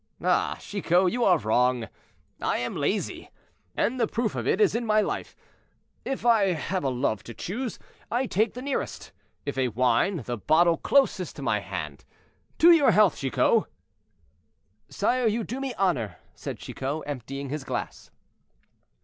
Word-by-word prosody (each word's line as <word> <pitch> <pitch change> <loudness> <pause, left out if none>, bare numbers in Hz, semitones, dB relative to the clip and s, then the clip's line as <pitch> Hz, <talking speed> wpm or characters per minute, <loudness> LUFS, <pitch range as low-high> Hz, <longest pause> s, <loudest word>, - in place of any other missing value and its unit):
"Ah, - - +1
Chicot! 180 -2 +1
you 245 0 0
are 180 -5 +5
wrong; 125 0 +1 0.5
I - - 0
am - - -3
lazy, - - -2 0.5
and 255 +2 0
the 230 - +2
proof 230 -3 -1
of - - -3
it 190 - +2
is 215 - +4
in 235 +2 -1
my 215 -1 +3
life. 210 - -2 0.7
If 265 -3 -4
I 210 -6 +4
have 175 +4 -3
a 135 - +1
love 125 -5 -1
to 115 - -9
choose, 235 +6 -4 0.3
I 245 +3 0
take 220 0 0
the 250 - -6
nearest; 275 -1 -4 0.3
if 140 -2 -3
a 130 - +2
wine, 125 - +1
the 120 -1 -3
bottle 165 +8 +3
close 280 -1 +2
to - - -10
my - - +1
hand. - - -6 0.5
To 340 +2 +7
your 315 -6 +6
health, 210 -3 +4
Chicot." 150 - +2 1.2
"Sire, 250 -1 +1
you 225 +1 0
do 250 +5 -5
me 270 -1 -3
honor," 130 - 0 0.2
said - - -6
Chicot, 140 +4 -4
emptying 135 0 -5
his 150 0 -4
glass. 130 -2 -5
180 Hz, 160 wpm, -26 LUFS, -, 1.2 s, To